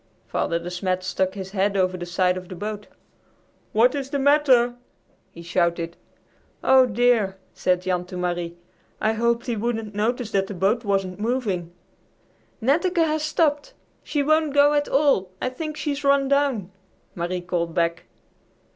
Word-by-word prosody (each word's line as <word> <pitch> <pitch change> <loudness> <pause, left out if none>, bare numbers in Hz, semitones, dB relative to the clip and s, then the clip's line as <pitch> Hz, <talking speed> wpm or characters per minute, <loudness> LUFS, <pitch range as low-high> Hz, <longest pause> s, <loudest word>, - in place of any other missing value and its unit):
Father 170 - -1
De 170 +1 -6
Smet 185 0 -2
stuck 185 +1 -1
his 190 -1 -6
head 200 0 0
over 185 -1 +1
the 175 -1 -6
side 180 +1 +1
of 185 -1 -8
the 185 - -7
boat. 210 +3 -5 0.8
"What 235 +4 +4
is 275 -2 -4
the 280 - -1
matter?" 270 -4 +4 0.6
he 170 - -11
shouted. 170 0 0 0.7
"Oh, 260 -1 +6
dear!" 225 -4 +2 0.2
said 180 0 0
Jan 180 -1 -1
to 180 0 -8
Marie. 175 -1 -3 0.4
"I 220 +1 +1
hoped 235 +1 0
he 240 - -1
wouldn't 225 -1 -3
notice 225 +2 -1
that 195 -2 +1
the 205 - -6
boat 205 +6 +1
wasn't 195 -2 -1
moving." 210 -7 -1 0.9
"Netteke 335 - +2
has 310 0 0
stopped. 305 -1 0 0.3
She 290 -2 -1
won't 310 0 +2
go 290 +1 +6
at 290 0 +1
all. 275 -10 +2
I - - -1
think 305 +4 -6
she's 290 -1 -3
run 280 -1 +3
down!" 270 -9 +1 0.4
Marie 175 +1 -2
called 170 -2 -2
back. 170 -1 0
210 Hz, 160 wpm, -23 LUFS, 180-270 Hz, 0.9 s, Oh